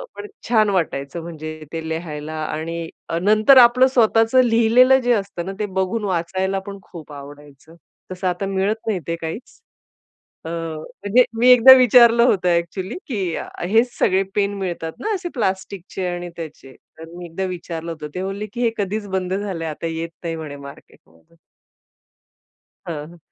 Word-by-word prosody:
पण 415 Hz, -, -8 dB, 0.2 s
छान 215 Hz, -3 st, +4 dB
वाटायचं, 165 Hz, -4 st, -2 dB
म्हणजे 155 Hz, -1 st, -8 dB
ते 160 Hz, -1 st, -5 dB
लिहायला. 155 Hz, -2 st, -5 dB
आणि 165 Hz, +2 st, -4 dB, 0.2 s
अ, 165 Hz, -, -1 dB
नंतर 215 Hz, +6 st, +5 dB
आपलं 250 Hz, +1 st, +7 dB
स्वतःचं 225 Hz, +1 st, +4 dB
लिहिलेलं 240 Hz, +3 st, +5 dB
जे 245 Hz, 0 st, +2 dB
असतं 195 Hz, -4 st, -3 dB
ना, 195 Hz, -, -4 dB
ते 210 Hz, -, 0 dB
बघून 210 Hz, +4 st, -1 dB
वाचायला 190 Hz, +2 st, -1 dB
पण 200 Hz, 0 st, -7 dB
खूप 160 Hz, -4 st, -12 dB
आवडायचं. 145 Hz, +2 st, -13 dB, 0.4 s
तसं 185 Hz, 0 st, -3 dB
आता 180 Hz, +2 st, -2 dB
मिळत 195 Hz, +3 st, -2 dB
नाही 200 Hz, -5 st, 0 dB
ते 165 Hz, -, -1 dB
काहीच. 165 Hz, +8 st, -4 dB, 1.1 s
अ, -, -, -5 dB
म्हणजे 170 Hz, +8 st, 0 dB, 0.2 s
मी 245 Hz, -, +4 dB
एकदा 250 Hz, +2 st, +10 dB
विचारलं 235 Hz, -1 st, +6 dB
होतं 180 Hz, -6 st, +2 dB
ॲक्चुअली, 175 Hz, +4 st, -1 dB
की 195 Hz, -, -2 dB
अ, -, -, -5 dB, 0.2 s
हेच 230 Hz, +4 st, +3 dB
सगळे 190 Hz, +1 st, +2 dB
पेन 200 Hz, 0 st, +1 dB
मिळतात 175 Hz, -4 st, -4 dB
ना, 435 Hz, 0 st, -2 dB
असे 360 Hz, -2 st, -4 dB
प्लास्टिक 195 Hz, -5 st, -2 dB
चे 185 Hz, -, -2 dB
आणि 175 Hz, 0 st, -4 dB
त्याचे. 145 Hz, -5 st, -10 dB, 0.2 s
तर 165 Hz, 0 st, -10 dB
मी 175 Hz, 0 st, -8 dB
एकदा 170 Hz, +3 st, -5 dB
विचारलं 170 Hz, -2 st, -5 dB
होतं, 155 Hz, -2 st, -7 dB
ते 185 Hz, -, -3 dB
बोलले, 195 Hz, +2 st, -4 dB
की 240 Hz, -, -4 dB
"हे 235 Hz, -, +3 dB
कधीच 205 Hz, +1 st, -3 dB
बंद 190 Hz, -1 st, -2 dB
झालंय, 190 Hz, -5 st, -3 dB
आता 155 Hz, +2 st, -6 dB
येत 165 Hz, +1 st, -4 dB
नाही" 165 Hz, -1 st, -3 dB
म्हणे, 155 Hz, -3 st, -7 dB
"मार्केटमध्ये." 80 Hz, -, -18 dB, 1.5 s
हां. 155 Hz, -3 st, -5 dB
हं, 170 Hz, +1 st, -15 dB
185 Hz, 165 wpm, -21 LUFS, 165-215 Hz, 1.5 s, एकदा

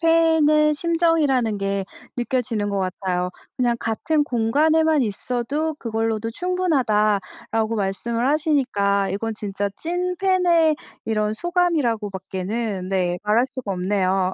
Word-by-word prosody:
팬의 320 Hz, -2 st, +4 dB
심정이라는 300 Hz, -9 st, +1 dB
게 195 Hz, 0 st, -1 dB, 0.3 s
느껴지는 240 Hz, -4 st, -1 dB
것 200 Hz, -, -1 dB
같아요. 185 Hz, -1 st, -2 dB, 0.3 s
"그냥 240 Hz, -2 st, +1 dB
같은 295 Hz, +7 st, 0 dB
공간에만 300 Hz, +6 st, +2 dB
있어도 250 Hz, +8 st, -2 dB
그걸로도 225 Hz, -1 st, -2 dB
충분하다"라고 225 Hz, -, 0 dB
말씀을 230 Hz, +4 st, -1 dB
하시니까 255 Hz, -10 st, +1 dB
이건 225 Hz, +3 st, -2 dB
진짜 205 Hz, -1 st, -3 dB
찐팬의 355 Hz, -2 st, +2 dB, 0.3 s
이런 215 Hz, -1 st, 0 dB
소감이라고 315 Hz, -, 0 dB
밖에는 190 Hz, +1 st, -4 dB
네 180 Hz, -2 st, 0 dB
말 210 Hz, +1 st, +1 dB
할 245 Hz, -, +4 dB
수가 255 Hz, -5 st, -6 dB
없네요. 185 Hz, 0 st, 0 dB
230 Hz, 290 characters per minute, -22 LUFS, 200-310 Hz, 0.3 s, 팬의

